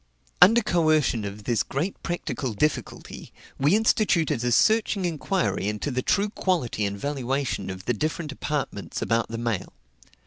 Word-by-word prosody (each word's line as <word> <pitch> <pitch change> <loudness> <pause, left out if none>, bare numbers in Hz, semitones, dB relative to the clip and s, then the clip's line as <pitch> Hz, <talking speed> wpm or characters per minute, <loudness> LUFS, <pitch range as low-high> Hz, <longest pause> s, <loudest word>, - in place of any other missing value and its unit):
Under 225 +6 +7
coercion 155 - +2
of 100 +1 -7
this 115 0 +1
great 160 +9 -3
practical 145 -7 -3
difficulty, 150 +9 -3 0.3
we 145 +8 +4
instituted 175 - +2
a 120 - +1
searching 215 - +3
inquiry 170 - -1
into 105 +7 -2
the 130 0 -1
true 205 +9 +1
quality 160 - -1
and 100 0 -5
valuation 135 -4 -2
of 95 0 -7
the 120 - +1
different 155 +5 -3
apartments 140 -9 -3
about 115 0 +1
the 115 - -4
mail. 115 -4 -3
140 Hz, 145 wpm, -25 LUFS, 115-175 Hz, 0.3 s, Under